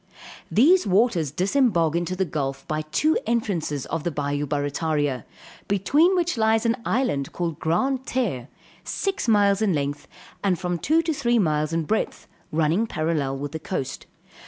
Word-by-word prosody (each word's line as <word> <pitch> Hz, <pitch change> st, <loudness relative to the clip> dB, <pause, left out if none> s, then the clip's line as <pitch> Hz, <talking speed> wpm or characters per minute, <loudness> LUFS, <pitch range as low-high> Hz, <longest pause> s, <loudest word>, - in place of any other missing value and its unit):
These 325 Hz, -, +4 dB
waters 190 Hz, -, +2 dB
disembogue 180 Hz, -, +2 dB
into 175 Hz, +2 st, -1 dB
the 190 Hz, +1 st, 0 dB
gulf 140 Hz, -4 st, -4 dB
by 155 Hz, 0 st, -1 dB
two 300 Hz, -, +1 dB
entrances 185 Hz, -, -1 dB
of 165 Hz, -2 st, -3 dB
the -, -, 0 dB
bayou 145 Hz, -1 st, -2 dB
Barrataria, 145 Hz, -2 st, -1 dB, 0.4 s
between 285 Hz, -, +3 dB
which 345 Hz, -8 st, 0 dB
lies 220 Hz, +1 st, +3 dB
an 230 Hz, +2 st, +2 dB
island 220 Hz, -, 0 dB
called 170 Hz, -4 st, -3 dB
Grand 255 Hz, +12 st, 0 dB
Terre, 190 Hz, -, -1 dB, 0.4 s
six 390 Hz, -8 st, -2 dB
miles 205 Hz, -2 st, +4 dB
in 205 Hz, -4 st, +2 dB
length, 145 Hz, 0 st, -3 dB, 0.4 s
and 190 Hz, -3 st, +2 dB
from 180 Hz, -1 st, -2 dB
two 320 Hz, -, +2 dB
to 325 Hz, -1 st, 0 dB
three 240 Hz, -4 st, +1 dB
miles 155 Hz, -6 st, +1 dB
in 165 Hz, 0 st, 0 dB
breadth, 215 Hz, +8 st, -2 dB, 0.3 s
running 165 Hz, +8 st, +1 dB
parallel 155 Hz, -7 st, -1 dB
with 145 Hz, +1 st, -5 dB
the 160 Hz, -, -5 dB
coast. 150 Hz, -4 st, -4 dB
175 Hz, 160 wpm, -24 LUFS, 150-230 Hz, 0.4 s, These